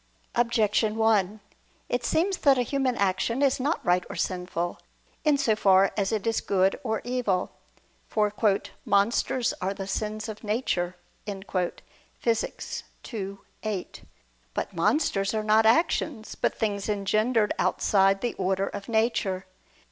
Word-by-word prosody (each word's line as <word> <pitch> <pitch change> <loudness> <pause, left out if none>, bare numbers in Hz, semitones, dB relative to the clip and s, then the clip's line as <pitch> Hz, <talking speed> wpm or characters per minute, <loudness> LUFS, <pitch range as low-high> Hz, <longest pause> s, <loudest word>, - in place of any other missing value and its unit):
Objection 220 -2 +2
1: 215 -2 +2 0.5
It 245 0 -1
seems 360 +9 +1
that 275 -2 +4
a 250 - +2
human 265 0 0
action 200 +7 +1
is 275 0 +3
not 290 +6 -1
right 180 0 +3
or - - -6
sinful, 180 -2 -2 0.4
in 300 -2 +4
so 235 -6 +2
far 195 -2 +4
as 200 0 0
it 215 -3 -1
is 225 -1 +1
good 190 -1 +2
or 220 -3 -1
evil. 240 -7 -1 0.6
For 210 -1 +1 0.5
"monsters 230 +4 +2
are 190 +2 -1
the 195 - -5
sins 215 +2 -3
of 215 0 -8
nature" 205 -5 -1 0.3
(Phys. 200 +3 -3 0.3
ii, 200 -2 -4 0.2
8). 210 -4 -4 0.5
But - - -3
monsters 200 -10 +1
are 215 - 0
not 220 +1 +4
actions, 240 -2 +1
but - - -1
things 205 -2 -1
engendered 215 +2 +1
outside 195 -1 +3
the 240 - -1
order 190 +1 +1
of 200 +1 -7
nature. 220 -4 0
215 Hz, 135 wpm, -27 LUFS, 195-235 Hz, 0.6 s, that